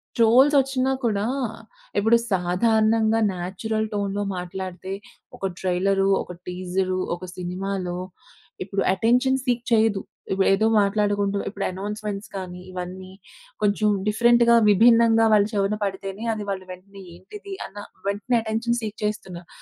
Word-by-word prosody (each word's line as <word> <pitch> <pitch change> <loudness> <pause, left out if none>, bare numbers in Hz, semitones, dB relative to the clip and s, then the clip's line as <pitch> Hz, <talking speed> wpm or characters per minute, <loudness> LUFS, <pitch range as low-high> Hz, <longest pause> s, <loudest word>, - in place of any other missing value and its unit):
ట్రోల్‌సొచ్చినా 265 +3 +4
కూడా 210 -3 0 0.7
ఇప్పుడు 225 +3 +4
సాధారణంగా 220 +4 +2
న్యాచురల్ 210 +5 -3
టోన్‌లో 200 0 -1
మాట్లాడితే 185 +1 -6 0.4
ఒక - - -4
ట్రైలరు, 195 +1 +1
ఒక 180 - -9
టీజరు, 185 +1 -2 0.2
ఒక 175 - -13
సినిమాలో 180 0 -3 0.7
ఇప్పుడు 195 +1 -2
అటెన్షన్ 245 +6 +2
సీక్ 245 -2 0
చేయదు. 220 -3 +3 0.3
ఇప్ 195 - 0
ఏదో 215 +3 +2
మాట్లాడుకుంటూ 205 0 +1
ఇప్పుడు 195 -1 -4
అనౌన్స్‌మెంట్స్ 205 +1 -5
కానీ, 180 -1 -7
ఇవన్నీ 185 +1 -7 0.5
కొంచెం 210 +1 +2 0.2
డిఫరెంట్‌గా 235 +2 +4
విభిన్నంగా 225 +2 +5
వాళ్ళ 205 -1 +5
చెవున 200 0 +1
పడితేనే 195 +1 -4
అది 215 -1 -5
వాళ్ళు 190 -1 -4
వెంటనే 195 +2 -12
ఏంటిది 390 - -10
అన్న 205 - -13 0.3
వెంటనే 205 +5 0
అటెన్షన్ 230 +2 -1
సీక్ 215 -1 -5
చేస్తున్నారు 185 -5 -4
205 Hz, 120 wpm, -24 LUFS, 190-225 Hz, 0.7 s, విభిన్నంగా